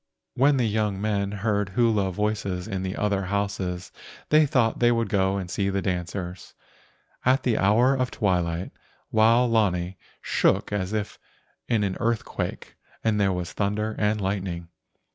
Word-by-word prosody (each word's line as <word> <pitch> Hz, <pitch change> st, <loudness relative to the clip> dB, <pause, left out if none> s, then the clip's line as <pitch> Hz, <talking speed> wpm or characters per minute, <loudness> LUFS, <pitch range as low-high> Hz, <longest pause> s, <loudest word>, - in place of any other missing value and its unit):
When 140 Hz, +2 st, +3 dB
the 125 Hz, -, +2 dB
young 105 Hz, -2 st, 0 dB
men 100 Hz, -1 st, -1 dB
heard 105 Hz, -1 st, -1 dB
hula 105 Hz, -3 st, +2 dB
voices 100 Hz, -2 st, -2 dB
in 95 Hz, -1 st, -3 dB
the 95 Hz, +1 st, -3 dB
other 100 Hz, -2 st, 0 dB
houses 95 Hz, -2 st, -2 dB, 0.4 s
they 155 Hz, 0 st, +5 dB
thought 120 Hz, -4 st, +1 dB
they 120 Hz, 0 st, +4 dB
would 115 Hz, -1 st, 0 dB
go 95 Hz, -2 st, +1 dB
and 95 Hz, -2 st, -4 dB
see 100 Hz, +2 st, -1 dB
the 95 Hz, 0 st, -1 dB
dancers. 90 Hz, 0 st, -4 dB, 0.7 s
At 130 Hz, +1 st, +3 dB
the 120 Hz, -3 st, +1 dB
hour 115 Hz, +7 st, +4 dB
of 130 Hz, -2 st, 0 dB
twilight 90 Hz, -4 st, -1 dB, 0.4 s
Wao 115 Hz, +3 st, +5 dB
lani 95 Hz, -6 st, +1 dB, 0.2 s
shook -, -, +1 dB
as 95 Hz, -1 st, -1 dB
if 105 Hz, -2 st, -3 dB, 0.5 s
in 115 Hz, -3 st, +2 dB
an 95 Hz, -2 st, -1 dB
earthquake, 115 Hz, -1 st, -3 dB, 0.3 s
and 105 Hz, -2 st, +2 dB
there 100 Hz, -1 st, +3 dB
was 90 Hz, -2 st, -4 dB
thunder 105 Hz, +2 st, -1 dB
and 105 Hz, 0 st, +1 dB
lightning. 95 Hz, -4 st, -3 dB
100 Hz, 155 wpm, -25 LUFS, 95-110 Hz, 0.7 s, they